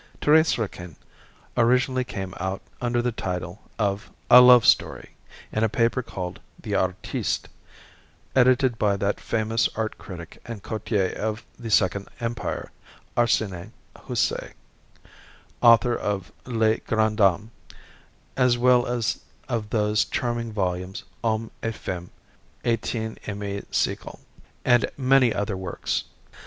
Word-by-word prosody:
"Thérèse 160 Hz, +2 st, +4 dB
Raquin" 90 Hz, -7 st, -5 dB, 0.6 s
originally 125 Hz, +2 st, +3 dB
came 95 Hz, -7 st, -6 dB
out 95 Hz, +1 st, -3 dB, 0.2 s
under 120 Hz, -1 st, 0 dB
the 125 Hz, -, +1 dB
title 90 Hz, -2 st, -4 dB, 0.2 s
of 100 Hz, -1 st, -1 dB, 0.2 s
"A 125 Hz, -, +11 dB
Love 125 Hz, -2 st, +8 dB
Story" -, -, +2 dB, 0.4 s
in 110 Hz, -, 0 dB
a 110 Hz, -, +3 dB
paper 115 Hz, +3 st, +1 dB
called 90 Hz, -6 st, -6 dB, 0.2 s
the -, -, -5 dB
"Artiste," 95 Hz, 0 st, -1 dB, 0.9 s
edited 130 Hz, -1 st, +4 dB
by 100 Hz, -2 st, +2 dB
that 100 Hz, +1 st, -1 dB
famous 110 Hz, 0 st, 0 dB
art 110 Hz, 0 st, -3 dB
critic 85 Hz, -3 st, -10 dB
and 115 Hz, -4 st, -8 dB
courtier 105 Hz, -3 st, -1 dB
of 110 Hz, +1 st, -3 dB
the 115 Hz, -2 st, -6 dB
Second 100 Hz, -1 st, +2 dB
Empire, 115 Hz, 0 st, -3 dB, 0.4 s
Arsene 105 Hz, -4 st, 0 dB, 0.2 s
Houssaye, -, -, -2 dB, 1.1 s
author 120 Hz, 0 st, +6 dB
of 100 Hz, -3 st, -3 dB, 0.2 s
"Les 110 Hz, -2 st, +2 dB
Grandes 110 Hz, -1 st, 0 dB
Dames," 100 Hz, +1 st, +3 dB, 0.8 s
as 125 Hz, -2 st, +3 dB
well 125 Hz, 0 st, +4 dB
as 120 Hz, -2 st, -1 dB, 0.3 s
of 115 Hz, -5 st, -2 dB
those 105 Hz, -1 st, +2 dB
charming 120 Hz, -1 st, -2 dB
volumes 95 Hz, -2 st, -2 dB, 0.2 s
"Hommes 110 Hz, 0 st, -1 dB
et 115 Hz, -1 st, -2 dB
Femmes 90 Hz, -3 st, -5 dB, 0.5 s
du 115 Hz, -, +3 dB
18eme 105 Hz, -3 st, -5 dB
Siècle," -, -, -2 dB, 0.5 s
and 120 Hz, -1 st, +4 dB
many 130 Hz, -2 st, +4 dB
other 100 Hz, -1 st, -2 dB
works. 95 Hz, -2 st, -3 dB
110 Hz, 120 wpm, -25 LUFS, 100-120 Hz, 1.1 s, A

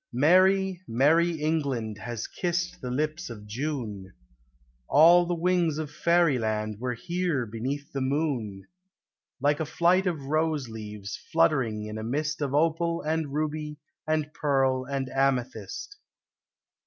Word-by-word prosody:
Merry, 185 Hz, +6 st, +4 dB
merry 160 Hz, +9 st, +3 dB
England 140 Hz, -9 st, -1 dB
has 120 Hz, -1 st, -5 dB
kissed 175 Hz, 0 st, -2 dB
the 125 Hz, -, -4 dB
lips 155 Hz, +5 st, -2 dB
of 105 Hz, -3 st, -9 dB
June: 110 Hz, -5 st, -4 dB, 0.7 s
All 170 Hz, +4 st, +6 dB
the 175 Hz, -, 0 dB
wings 170 Hz, -2 st, +1 dB
of 155 Hz, -2 st, -4 dB
fairyland 125 Hz, -11 st, +1 dB
were 125 Hz, 0 st, -2 dB
here 170 Hz, -2 st, -1 dB
beneath 130 Hz, +6 st, -4 dB
the 135 Hz, -, -2 dB
moon; 130 Hz, -8 st, -1 dB, 0.7 s
Like 145 Hz, +2 st, +2 dB
a -, -, 0 dB
flight 180 Hz, +4 st, +3 dB
of 160 Hz, -6 st, -2 dB
rose 155 Hz, -2 st, 0 dB
leaves 105 Hz, -2 st, -7 dB
fluttering 135 Hz, -10 st, +2 dB
in 105 Hz, 0 st, -6 dB
a -, -, -5 dB
mist 150 Hz, +6 st, -2 dB
Of 140 Hz, -1 st, -1 dB
opal 165 Hz, +2 st, +1 dB
and 155 Hz, -2 st, -1 dB
ruby 150 Hz, 0 st, -3 dB, 0.3 s
and 155 Hz, -1 st, 0 dB
pearl 135 Hz, -3 st, +1 dB
and 135 Hz, -1 st, -2 dB
amethyst. 135 Hz, -, -2 dB
145 Hz, 130 wpm, -27 LUFS, 125-165 Hz, 0.7 s, All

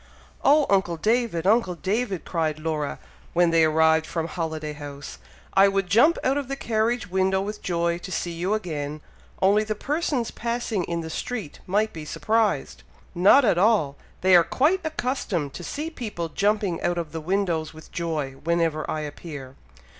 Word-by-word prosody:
"Oh! 295 Hz, +1 st, +5 dB
uncle 190 Hz, -4 st, +1 dB
David! 220 Hz, -3 st, 0 dB
uncle 200 Hz, -3 st, +3 dB
David!" 195 Hz, +1 st, -2 dB
cried 160 Hz, -3 st, -1 dB
Laura, 155 Hz, -2 st, -2 dB, 0.4 s
when 175 Hz, -1 st, +4 dB
they 165 Hz, -1 st, +5 dB
arrived 160 Hz, 0 st, +3 dB
from 165 Hz, -1 st, -2 dB
Holiday 160 Hz, -3 st, -4 dB
House, 145 Hz, -1 st, -9 dB, 0.3 s
"I 195 Hz, +1 st, +6 dB
would 195 Hz, -1 st, +1 dB
jump 235 Hz, -, +4 dB
out 270 Hz, +2 st, +2 dB
of 280 Hz, -, -5 dB
the 275 Hz, -, -3 dB
carriage 225 Hz, -5 st, -1 dB
window 190 Hz, 0 st, +2 dB
with 210 Hz, +2 st, -4 dB
joy 170 Hz, -1 st, 0 dB
to 185 Hz, -, -8 dB
see 175 Hz, -, -2 dB
you 180 Hz, +5 st, -1 dB
again; 150 Hz, -7 st, -4 dB, 0.4 s
only 205 Hz, +3 st, +5 dB
the 215 Hz, 0 st, -3 dB
persons 285 Hz, -1 st, -1 dB
passing 235 Hz, -5 st, -2 dB
in 170 Hz, -1 st, -2 dB
the 160 Hz, 0 st, -6 dB
street 220 Hz, -8 st, -5 dB
might 210 Hz, +4 st, +1 dB
be 160 Hz, -, -7 dB
surprised!" 220 Hz, +7 st, 0 dB, 0.3 s
"Not 200 Hz, +10 st, +6 dB
at 180 Hz, -5 st, +3 dB
all! 190 Hz, -9 st, +3 dB, 0.3 s
They 185 Hz, 0 st, +6 dB
are 175 Hz, -, +7 dB
quite 315 Hz, -, +2 dB
accustomed 245 Hz, -, -2 dB
to 175 Hz, -, -7 dB
see 305 Hz, -, -4 dB
people 210 Hz, -, -5 dB
jumping 200 Hz, 0 st, 0 dB
out 175 Hz, -, 0 dB
of 165 Hz, -3 st, -3 dB
the 160 Hz, -, -5 dB
windows 170 Hz, -3 st, -1 dB
with 160 Hz, 0 st, -14 dB
joy, 160 Hz, -5 st, -2 dB
whenever 165 Hz, -2 st, 0 dB
I 155 Hz, -, -2 dB
appear." 145 Hz, -3 st, -8 dB
180 Hz, 170 wpm, -25 LUFS, 160-215 Hz, 0.4 s, are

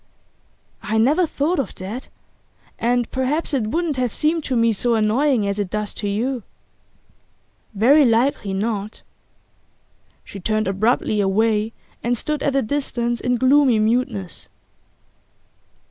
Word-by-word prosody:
'I 220 Hz, +1 st, -2 dB
never 295 Hz, +10 st, +3 dB
thought 305 Hz, +4 st, -1 dB
of 275 Hz, -, -3 dB
that. 205 Hz, +8 st, -7 dB, 0.7 s
And 240 Hz, 0 st, 0 dB
perhaps 275 Hz, +5 st, -1 dB
it 245 Hz, -6 st, 0 dB
wouldn't 320 Hz, +3 st, -1 dB
have 250 Hz, -3 st, -1 dB
seemed 315 Hz, +1 st, +1 dB
to 260 Hz, -, -1 dB
me 230 Hz, -1 st, +3 dB
so 235 Hz, +3 st, +1 dB
annoying 225 Hz, +2 st, +2 dB
as 200 Hz, +1 st, -2 dB
it 200 Hz, -3 st, -2 dB
does 210 Hz, +1 st, -3 dB
to 205 Hz, -, -3 dB
you.' 240 Hz, +5 st, -1 dB, 1.3 s
'Very 270 Hz, +9 st, +5 dB
likely 230 Hz, -3 st, +1 dB
not.' 210 Hz, +1 st, -3 dB, 1.2 s
She 200 Hz, -, -10 dB
turned 215 Hz, +2 st, -1 dB
abruptly 210 Hz, +2 st, +1 dB
away, 215 Hz, +2 st, +1 dB, 0.3 s
and 240 Hz, +1 st, 0 dB
stood 300 Hz, +5 st, -2 dB
at 275 Hz, -, 0 dB
a 275 Hz, -, +2 dB
distance 240 Hz, -2 st, -2 dB
in 250 Hz, 0 st, +1 dB
gloomy 260 Hz, -1 st, +4 dB
muteness. 215 Hz, -, -1 dB
235 Hz, 130 wpm, -21 LUFS, 215-270 Hz, 1.3 s, Very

